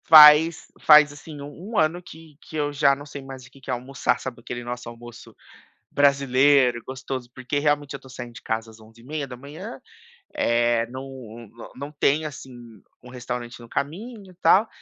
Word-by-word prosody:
Faz 155 +1 +8
faz 150 -1 +7
assim 150 0 -11
um 175 +10 -7
ano 160 +3 +2
que 160 -3 -14
que - - -12
eu 145 -1 -1
já 140 -1 +4
não 145 +1 -10
sei 145 -1 -8
mais 135 -1 -10
o - - -18
que 135 - -18
que - - -12
é - - +1
almoçar. 125 +2 -1
Sabe 120 -2 -7
aquele 120 +1 -6
nosso 120 0 -6
almoço 120 0 -12 0.6
brasileiro 140 -2 +4
gostoso? 130 -1 -6
Porque 130 +3 -3
realmente 145 -1 0
eu - - -4
estou 135 - -17
saindo 120 -2 -8
de 115 - -11
casa 110 0 -3
às 110 - -17
11:30h 120 +7 -7
da 125 -1 -9
manhã, 155 - -9 0.6
eh, 120 0 +2
não 125 -3 -9 0.3
não 140 +3 -7
tem 150 +1 +1
assim 140 -3 -8 0.5
um 125 - -12
restaurante 125 -1 -6
no 120 - -12
caminho, 195 - -5
tal. 210 +4 +5
135 Hz, 180 wpm, -24 LUFS, 125-150 Hz, 0.6 s, Faz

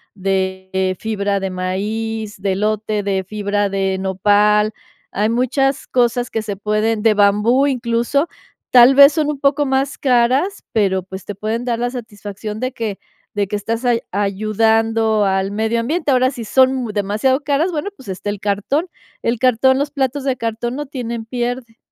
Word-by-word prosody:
de 190 -1 -1
fibra 200 -2 -1
de 190 0 -3
maíz, 210 +3 -3
de 195 0 0
elote, 210 +1 -1
de 195 -1 -1
fibra 205 0 -1
de 195 -1 -1
nopal. 205 +2 +2 0.4
Hay 210 +3 0
muchas 270 +3 0
cosas 245 -1 +1
que 225 - -2
se 205 -2 -4
pueden 215 +2 0
de 220 0 +4
bambú, 210 +7 +3
incluso. 245 +3 0 0.4
Tal 250 +2 +7
vez 280 +1 +8
son 305 0 0
un 290 - -3
poco 280 +1 +2
más 270 0 0
caras, 260 +9 +1
pero, 190 -4 +1
pues, 190 +1 -9
te 205 - -6
pueden 220 +4 -3
dar 235 -2 -1
la 245 - 0
satisfacción 210 -3 -7
de 255 +2 -2
que 215 -5 -4 0.4
de 205 -1 0
que 210 - -3
estás 225 +4 -3
ay 240 -1 +2
ayudando 220 +2 +1
al 195 0 0
medio 220 +2 0
ambiente. 295 +5 -1
Ahora, 255 0 +3
si 240 -4 -7
son 260 +4 +4
mu 245 -4 -3
demasiado 210 +7 0
caras, 295 +5 +1
bueno, 330 +4 -3
pues, 260 - -13
está 190 +2 -4
el 205 - -4
cartón. 210 - -1 0.4
El 230 0 0
cartón. 260 +2 +3
Los 285 0 -1
platos 275 -1 -1
de 265 -2 +1
cartón 230 +2 -3
no 295 +1 -4
tienen 235 -4 -5
pierde. 240 0 -4
225 Hz, 170 wpm, -18 LUFS, 205-255 Hz, 0.4 s, vez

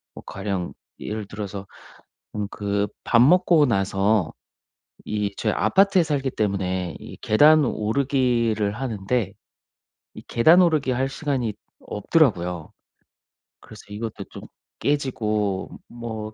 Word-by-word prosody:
뭐 - - -10
가령 95 -3 -4 0.3
예를 105 -1 -5
들어서 100 -1 -7 0.7
음 105 -1 -2
그 100 0 -1 0.2
밥 115 - +3
먹고 165 +2 +5
나서 95 - +1 0.7
이 105 -1 -2
저희 110 - -1
아파트에 195 - +3
살기 145 -4 -1
때문에 95 -5 -2
이 - - -11
계단 150 +7 +5
오르기를 115 -3 0
하는데 110 -3 -2 0.8
이 - - -10
계단 160 +10 +5
오르기 155 -7 +2
할 130 +2 0
시간이 135 -6 -2 0.2
없더라고요. 90 - 0 0.9
그래서 110 - -14
이것도 105 +2 -6
좀 - - -10 0.4
깨지고 110 -9 -1 0.2
뭐 110 -2 -7
110 Hz, 230 characters per minute, -23 LUFS, 100-135 Hz, 0.9 s, 먹고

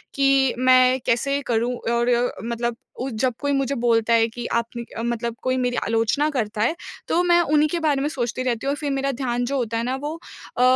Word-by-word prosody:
कि 275 -1 +3
मैं 255 0 +5
कैसे 275 +4 +1
करूँ 235 +2 +1 0.2
और 240 +1 +2
मतलब 235 0 -2 0.2
उ 265 +2 -2
जब 255 -2 +2
कोई 285 -1 -1
मुझे 275 0 0
बोलता 230 -1 +2
है 225 0 +4
कि 240 +1 -7
आपने 235 +1 -4
क 230 - -8
मतलब 235 -1 -2
कोई 255 0 +1
मेरी 245 -1 0
आलोचना 230 +7 +1
करता 220 -7 -2
है 240 +10 +2 0.3
तो 345 - +2
मैं 345 -1 +4
उन्हीं 305 -1 +3
के 345 - -1
बारे 295 -4 +1
में 290 - 0
सोचती 255 -4 -3
रहती 240 -2 -2
हूँ 275 - +1
और - - -1
फ़िर 290 -2 -3
मेरा 275 0 0
ध्यान 245 -2 -2
जो 275 +2 -1
होता 230 -3 -1
है 230 - -1
ना 255 +2 -1
वो 295 +3 -4 0.4
अ, - - +1
250 Hz, 225 wpm, -23 LUFS, 235-275 Hz, 0.4 s, मैं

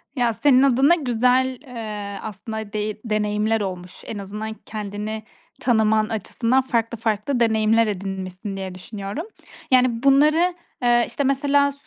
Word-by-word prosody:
Ya, 240 -3 +1
senin 270 +2 +4
adına 275 +5 +5
güzel, 255 -2 +1
eee, 215 -6 -6
aslında 220 +1 -6
dey 210 0 -3
deneyimler 215 0 0
olmuş. 180 -2 -5
En 215 - -6
azından 210 +2 -5
kendini 215 0 -6 0.4
tanıman 220 -2 +3
açısından 230 +4 0
farklı 235 -2 -1
farklı 225 +4 -1
deneyimler 225 0 +3
edinmişsin 195 0 -5
diye 190 -1 -5
düşünüyorum. 200 - -6 0.5
Yani, 250 -2 +3
bunları, 305 +6 +4 0.3
eee, 240 -1 +4
işte, 285 - -3
mesela 280 +1 +2
220 Hz, 125 wpm, -22 LUFS, 210-255 Hz, 0.5 s, adına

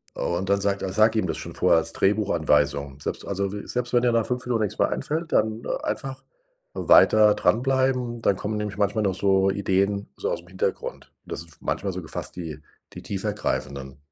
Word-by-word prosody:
Und 90 +3 -2
dann 100 0 +2
sagt 100 0 0
er 95 - -2
sag 110 +3 +4
ihm 110 - +1
das - - -2
schon - - -7
vor - - +2
als - - +1
Drehbuchanweisung. 75 -8 +1
Selbst - - -3
also, 100 0 -2
we 105 - -6
selbst 125 -1 -2
wenn 120 -1 +4
dir 120 -1 +3
nach 115 -1 +2
5 125 0 -2
Minuten 115 -3 +1
nix 105 - -2
mehr - - +3
einfällt, 160 +2 -3
dann 110 +1 +1 0.2
einfach 135 -1 -4 0.5
weiter 105 -1 +6
dranbleiben, 125 -1 +1
dann 100 - +3
kommen 105 +3 -3
nämlich 105 -2 -3
manchmal 105 +1 +1
noch 95 -2 +1
so 95 0 +3
Ideen 100 +1 0
so - - -2
ausm 85 - -4
Hintergrund. 95 0 -4
Das - - -5
ist 85 -1 -17
manchmal 100 -1 -2
so 95 - -4
gefasst 80 - -7
die 80 -4 -6 0.3
die - - -9
tiefergreifenden. 70 -10 -3
100 Hz, 190 wpm, -25 LUFS, 95-110 Hz, 0.5 s, weiter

